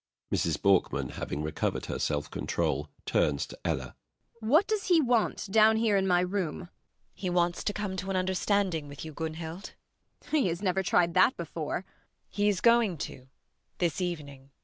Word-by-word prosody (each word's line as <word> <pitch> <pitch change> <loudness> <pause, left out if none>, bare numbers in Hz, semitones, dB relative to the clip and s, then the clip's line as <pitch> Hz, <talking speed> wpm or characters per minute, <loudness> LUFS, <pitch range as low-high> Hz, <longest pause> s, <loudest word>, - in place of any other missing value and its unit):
MRS. 80 -3 +1
BORKMAN. 100 -2 +2
[Having 75 +2 -4
recovered 75 - -2
her - - -4
self 75 -1 -1
control, 75 +2 -1 0.2
turns 70 -2 +1
to - - -12
ELLA.] - - -2 0.4
What 280 - +4
does 430 -2 -1
he 350 -3 +5
want 245 -6 +1
down 220 +1 +6
here 220 -2 +2
in 195 -1 +2
my 180 -1 +4
room? 180 -3 -1
ELLA - - -8
RENTHEIM. - - -19 0.4
He 185 -2 -4
wants 175 -1 +1
to - - 0
come 205 -2 -3
to 190 +1 -4
an 195 - -1
understanding 185 -3 0
with 145 +2 -8
you, 155 - -7
Gunhild. 160 +3 -6
MRS. - - -44
BORKMAN. 305 -1 +1
He 235 - +2
has 170 +1 -2
never 190 0 +1
tried 175 -2 +2
that 185 +8 +4
before. 165 -2 -4
ELLA - - -3
RENTHEIM. - - -33 0.3
He 205 0 +1
is 195 -3 0
going 230 -6 +4
to, 130 -2 -7 0.5
this 175 +1 0
evening. 145 -6 -5
180 Hz, 195 wpm, -29 LUFS, 160-205 Hz, 0.5 s, down